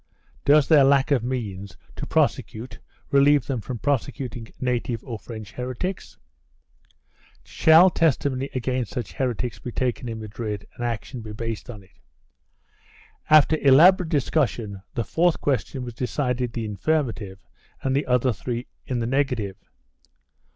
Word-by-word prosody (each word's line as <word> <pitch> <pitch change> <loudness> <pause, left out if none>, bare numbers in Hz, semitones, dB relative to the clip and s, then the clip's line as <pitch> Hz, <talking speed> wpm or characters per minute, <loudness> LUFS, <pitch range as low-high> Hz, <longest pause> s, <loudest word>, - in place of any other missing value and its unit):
Does 145 0 +5
their 150 -4 +6
lack 135 +1 +3
of 130 -5 +3
means 100 -8 -4 0.2
to - - -6
prosecute 115 +4 -1 0.3
relieve 140 -1 +5
them 130 -5 -2
from 125 +3 -5
prosecuting 130 -2 -2
native 125 -2 -2
or 115 -5 -6
French 110 -1 -9
heretics? 125 - -5 1.3
Shall 165 +4 +6
testimony 140 -4 +1
against 125 -4 -2
such 120 -3 -4
heretics 125 -2 -2
be 120 - -6
taken 125 0 -2
in 110 -1 -5
Madrid 105 -1 -5
and 120 - -6
action 120 +1 -4
be 110 -1 -8
based 115 0 -5
on 105 -5 -9
it? 95 - -26 1.3
After 155 +1 +6
elaborate 165 +6 +6
discussion 120 - 0
the 120 - 0
fourth 170 +7 +1
question 130 -1 -1
was 120 - -7
decided 125 -1 -2
in 115 - -1
the 105 -1 -4
affirmative 115 -11 -1 0.5
and 135 0 0
the 140 - 0
other 125 0 +2
three 120 +6 -4 0.2
in 125 - -1
the - - -1
negative. 125 -6 -1
125 Hz, 140 wpm, -24 LUFS, 115-140 Hz, 1.3 s, their